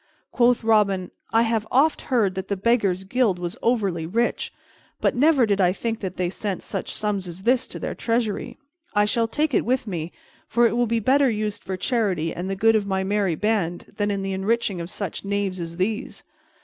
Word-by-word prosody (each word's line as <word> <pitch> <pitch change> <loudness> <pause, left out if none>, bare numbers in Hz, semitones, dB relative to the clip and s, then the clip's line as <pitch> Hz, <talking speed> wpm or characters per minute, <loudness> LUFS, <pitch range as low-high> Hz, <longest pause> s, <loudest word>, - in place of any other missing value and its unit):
Quoth 245 -1 +3
Robin, 200 -5 +2 0.2
"I 225 +1 +4
have 225 -2 0
oft 290 +5 +3
heard 225 -8 +2
that 190 0 -5
the 200 - -1
Beggars' 195 -3 +1
Guild 210 -1 +1
was 175 -1 -4
over 230 -4 +2
rich, 175 +8 -1 0.5
but - - +2
never 280 -1 +4
did 200 -2 +1
I 180 -1 +4
think 225 +3 -3
that 190 -2 -5
they 180 -1 0
sent 190 +1 -4
such - - -4
sums 205 -3 -2
as 175 +2 -8
this 250 +3 +2
to - - -8
their - - -4
treasury. 230 -3 -1 0.4
I 205 0 +4
shall 230 +2 +1
take 295 +5 0
it - - +3
with 255 +1 0
me, 175 -5 -4 0.4
for 235 +2 +3
it 230 - +2
will 240 0 +2
be 230 +1 +1
better 270 +4 +4
used 210 -1 -2
for 190 -1 -4
charity 185 -8 0
and 180 +2 -4
the 195 - -1
good 225 +3 +4
of 205 -2 +1
my 190 -1 0
merry 195 -3 +1
band 195 -3 -1
than 205 -1 0
in 200 -1 -1
the 195 0 -2
enriching 195 -1 0
of 170 - -6
such 195 -4 -5
knaves 200 -2 -1
as 170 0 -6
these." 210 +4 -2
205 Hz, 210 wpm, -24 LUFS, 190-230 Hz, 0.5 s, I